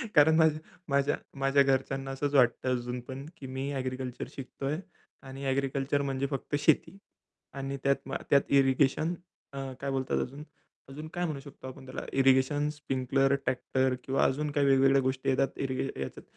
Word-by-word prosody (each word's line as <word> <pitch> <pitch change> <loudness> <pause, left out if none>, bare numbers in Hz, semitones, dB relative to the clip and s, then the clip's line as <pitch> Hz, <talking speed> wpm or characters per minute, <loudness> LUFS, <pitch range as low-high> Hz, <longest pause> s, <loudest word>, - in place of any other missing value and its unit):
कारण 150 +2 +7
माझ्या 160 -1 +4 0.3
माझ्या 140 +1 +2 0.2
माझ्या 135 +1 +4
घरच्यांना 135 0 0
असंच 140 +2 -2
वाटतं 125 0 +4
अजून 125 0 -3
पण 130 +3 -8
की 135 - -8
मी 135 +2 -3
ॲग्रीकल्चर 130 -1 -4
शिकतोय. 135 +2 -4 0.5
आणि 135 +1 -8
ॲग्रीकल्चर 135 +1 0
म्हणजे 135 -1 -1
फक्त 135 +1 -3
शेती 160 +5 +2 0.6
आणि 135 0 -3
त्यात 140 0 +4
मा - - -2
त्यात 140 - +6
इरिगेशन 140 +4 +3 0.4
अ, - - -7 0.2
काय 140 - -2
बोलतात 135 -1 0
अजून? 140 +4 -6 0.5
अजून 150 +3 -7
काय 175 0 -1
म्हणू 155 -4 -3
शकतो 135 -1 -11
आपण 130 0 -10
त्याला 130 - -6
इरिगेशन, 135 +3 +4
स्प्रिंकलर, 135 -2 0
ट्रॅक्टर 130 0 0
किंवा 135 +1 +1
अजून 145 +2 0
काही 145 -1 +2
वेगवेगळ्या 135 0 +5
गोष्टी 130 0 -1
येतात 135 0 +2 0.2
इरिगे 130 -1 -1
ह्याच्यात 65 0 -6
135 Hz, 160 wpm, -29 LUFS, 130-140 Hz, 0.6 s, कारण